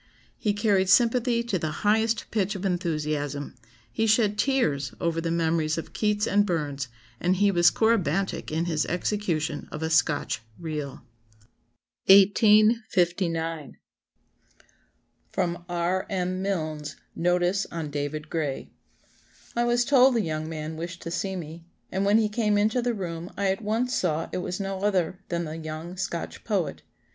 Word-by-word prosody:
He 210 - +1
carried 200 -3 +2
sympathy 235 +2 +4
to 210 -6 -1
the 155 - -2 0.2
highest 220 +2 +2
pitch 205 -2 0
of 195 0 -5
enthusiasm; 150 -5 -2 0.4
he 225 - 0
shed 215 -1 +3
tears 160 - 0
over 165 -1 0
the 165 - -2
memories 160 -1 +1
of 165 - -6
Keats 210 -1 +1
and 205 -1 +3
Burns, 145 -7 -2 0.3
and 180 +2 +2
he 200 +1 +3
was 175 -2 +5
corybantic 195 -5 +1
in 160 +2 0
his 160 -3 0
execution 170 -5 -1
of 150 - -5
a 160 - -1
Scotch 145 -6 +1 0.2
'reel.'" 150 -6 -5 1.0
1859. 190 - +4 1.6
[Sidenote: 175 0 -1
R. 175 +2 -1
M. 185 -1 -1
Milnes's 155 -6 -3 0.2
Notice 180 +2 +1
on 160 -3 -5
David 150 +1 -4
Gray.] 150 -5 -3 0.8
"I 240 - +2
was 240 0 +2
told 265 -2 +5
a 230 - +3
young 155 -3 -3
man 155 0 -5
wished 170 +2 -6
to 165 - -5
see 190 +2 -2
me, 165 -1 -7 0.3
and 190 +1 0
when 205 +2 +5
he 220 -1 +3
came 210 -1 +1
into 220 +4 +2
the 240 -1 0
room 170 -3 -5
I 195 -1 +2
at 195 - -3
once 230 +4 0
saw 165 -6 0
it - - -1
was 180 +1 -4
no 195 -1 -3
other 190 -3 0
than 170 -1 -1
the 155 +1 -6
young 160 +2 -6
Scotch 185 -2 -4
poet. 180 - -1
180 Hz, 155 wpm, -26 LUFS, 160-205 Hz, 1.6 s, was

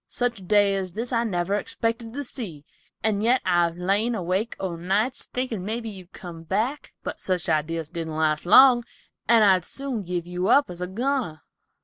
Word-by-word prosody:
Such 245 -3 -1
a - - -12
day 205 +1 +3
as 185 -2 -3
this 235 +4 -4
I 230 0 +2
never 185 -3 -1
expected 230 +2 -2
to 285 +2 -4
see, 185 - -5 0.4
and 210 -2 +1
yet 245 +4 +3
I 175 -1 +3
have 170 0 -4
lain 200 +6 +1
awake 190 +4 -1
o' 185 -3 -3
nights 200 +9 -1
thinkin' 250 -6 -3
mebby 225 +3 -3
you'd 185 -3 -11
come 170 -3 -9
back. 220 - -2
But - - -5
such 185 -2 -2
ideas 160 0 -1
didn't 165 -2 -4
last 155 +1 0
long, 245 +3 +8 0.4
and 230 -1 +6
I'd 190 -3 +5
soon 270 +1 -4
give 175 -2 -3
you 180 +1 -2
up 285 -8 +4
as 175 0 -8
a 180 - -2
goner." 235 - -2
195 Hz, 195 wpm, -25 LUFS, 175-235 Hz, 0.4 s, long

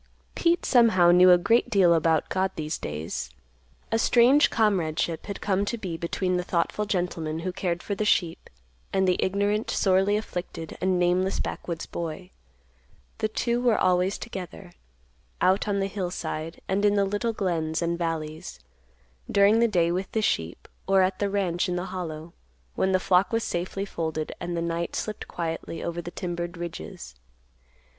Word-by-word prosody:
Pete 340 0 +1
somehow 220 -9 +5
knew 180 +1 +7
a 180 - +8
great 230 +7 +2
deal 190 -6 +5
about 160 -1 +2
God 190 0 0
these 155 0 -3
days. 75 +2 -4 0.6
A 225 - +2
strange 245 +6 +5
comradeship 170 -7 0
had 200 - -6
come 195 -1 +1
to 235 - -2
be 185 -6 -5
between 180 +2 -1
the 180 - -1
thoughtful 175 +4 -1
gentleman, 165 -5 -2
who 185 +2 -2
cared 175 -1 -2
for 205 - -3
the 200 - -1
sheep, 175 -5 0 0.4
and 190 -1 +2
the 180 - +2
ignorant, 205 +3 0
sorely 195 +1 +2
afflicted, 175 -5 -6
and 185 0 +2
nameless 180 +2 +1
backwoods 170 -2 -4
boy. 170 +2 -6 0.9
The 220 - +1
two 235 +2 -1
were 240 -3 +3
always 185 +1 +2
together, 190 -4 -8 0.7
out 190 +3 +2
on 200 -1 0
the 195 - +1
hillside 175 -4 -4
and 195 +2 0
in 205 0 +4
the 200 -1 +3
little 205 +4 -1
glens 170 -6 -1
and 170 0 0
valleys, 160 -2 -4 0.7
during 200 +3 +5
the 235 - +4
day 175 -5 +2
with 185 +2 -3
the 220 - 0
sheep, 85 - -1 0.2
or 195 -1 +5
at 185 0 -1
the 205 - 0
ranch 185 -2 0
in 180 - -1
the 180 +1 -2
Hollow, 165 -2 -6 0.4
when 190 - +1
the 185 - +3
flock 185 0 +2
was 230 -1 0
safely 185 +3 -3
folded 160 -4 -3
and 175 0 -4
the 170 - -1
night 170 0 -2
slipped 215 -1 -4
quietly 165 -1 -4
over 170 0 -3
the 175 - -7
timbered 175 0 -5
ridges. 175 - -7
185 Hz, 170 wpm, -26 LUFS, 170-200 Hz, 0.9 s, a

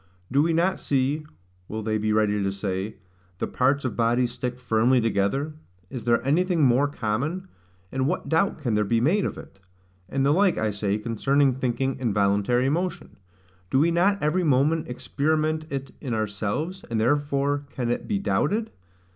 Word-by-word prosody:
Do 140 +3 +4
we 165 +2 +2
not 175 +4 +1
see 145 +3 0 0.4
(will 110 0 -5
they 110 0 0
be 110 0 0
ready 105 -1 +2
to 100 0 0
say) 100 +1 -3 0.4
the - - -1
parts 135 +2 +1
of 130 - -2
bodies 120 +1 +2
stick 125 0 -4
firmly 120 +1 +2
together? 115 +7 0 0.4
Is 125 -3 -6
there 120 0 +2
anything 170 +3 +2
more 130 +2 +4
common? 145 - -2 0.4
And 130 0 0
what - - -2
doubt 165 +5 +1
can 130 -8 -2
there 105 0 +2
be 115 +3 +1
made 175 - +2
of - - -3
it? - - -12 0.5
And 135 0 0
the 140 - +4
like, 190 +3 +3
I 110 -1 0
say, 100 0 -1
concerning 135 +5 +1
thinking 130 +1 -1
and 120 -6 -1
voluntary 105 +5 +2
motion. 170 +4 -2 0.5
Do 130 - +2
we 160 +5 +4
not 195 +3 +2
every 165 +5 +1
moment 150 +2 +2
experiment 155 +5 -1
it 135 -2 -4
in 125 -5 -2
ourselves, 110 - -3
and 115 -1 -1
therefore 145 +3 +1
can 120 -4 -2
it - - -3
be 210 - 0
doubted? 215 +2 0
130 Hz, 175 wpm, -25 LUFS, 115-155 Hz, 0.5 s, Do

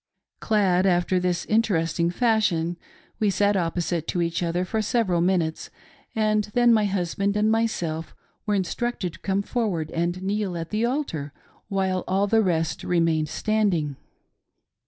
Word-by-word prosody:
Clad 195 -4 +2
after 180 0 +2
this 180 -1 -1
interesting 170 -7 +1
fashion, 180 -6 +1 0.4
we 215 - +2
sat 205 +1 +2
opposite 170 -2 -1
to 175 - -1
each 170 0 -2
other 175 +1 0
for 220 +4 -1
several 210 -5 +1
minutes, 170 -3 0 0.5
and 215 -1 +2
then 240 -1 +5
niy 215 -2 +3
husband 195 +2 -1
and 215 +1 +3
myself 175 -8 -1 0.3
were 210 - +2
instructed 190 -1 -2
to - - -13
come 195 0 -1
forward 200 -10 -2
and 175 +2 -2
kneel 195 -2 -1
at 165 -1 -6
the 215 +2 +1
altar 200 - -3 0.3
while 190 -2 0
all 195 +2 +2
the 225 +2 +3
rest 165 -5 0
remained 165 -3 +1
standing. 190 -9 0
185 Hz, 145 wpm, -24 LUFS, 170-215 Hz, 0.5 s, then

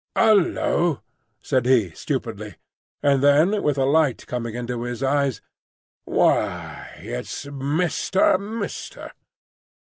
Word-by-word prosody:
"Hullo!" 175 -6 +2 0.4
said 130 -3 0
he, 115 -9 +3
stupidly; - - -5 0.5
and 140 -2 +3
then 155 +9 +4
with 145 -2 0
a 135 - +2
light 145 -2 +2
coming 115 -2 -4
into 120 0 -4
his 120 +1 -4
eyes, 140 -1 0 0.6
"Why, - - 0
it's 60 - -6
Mister—Mister?" 175 +9 -1
140 Hz, 95 wpm, -23 LUFS, 125-165 Hz, 0.6 s, then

